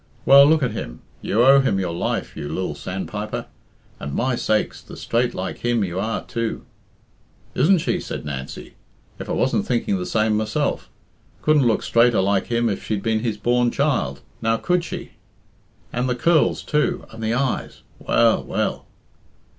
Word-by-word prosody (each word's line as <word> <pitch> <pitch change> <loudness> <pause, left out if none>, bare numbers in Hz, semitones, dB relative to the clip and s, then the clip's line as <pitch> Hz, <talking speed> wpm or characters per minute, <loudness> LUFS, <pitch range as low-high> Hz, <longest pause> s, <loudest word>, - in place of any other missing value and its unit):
"Well, 140 +1 +9
look 155 -1 +3
at 125 - 0
him. - - -6 0.2
You 115 +4 +2
owe 135 +1 +8
him 135 -8 +1
your 90 -3 -2
life, 85 - -2
you 75 - -5
lil 95 -4 -2
sandpiper. 95 +7 -5 0.5
And, 70 -1 -5
my 130 0 +1
sakes, 110 -2 -1
the - - -12
straight 120 +1 0
like 95 - -4
him 120 -2 +1
you 90 -1 -3
are, 110 +3 -2
too!" 115 -1 -4 0.9
"Isn't 180 +8 +4
she?" 160 - -1
said - - -6
Nancy. 70 -2 -6 0.5
"If - - -7
I - - 0
wasn't - - 0
thinking 115 -5 0
the 90 - -4
same 110 -1 +1
myself! 110 -1 -1 0.5
Couldn't 150 -4 +4
look 115 - +1
straighter 120 -2 +3
like 95 0 +1
him 120 0 +1
if 100 -3 -2
she'd 105 -2 -2
been 110 -1 +1
his 110 -2 -2
born 120 +3 +2
child; 140 +1 0 0.2
now, 115 0 +2
could 180 +7 0
she? - - -7 0.8
And 125 +1 -1
the 125 - 0
curls, 160 +5 +2
too, 150 0 0
and 115 0 -8
the 110 +1 0
eyes! 130 0 -2 0.2
Well, 115 -1 +3
well!" - - -2
115 Hz, 170 wpm, -22 LUFS, 100-125 Hz, 0.9 s, Well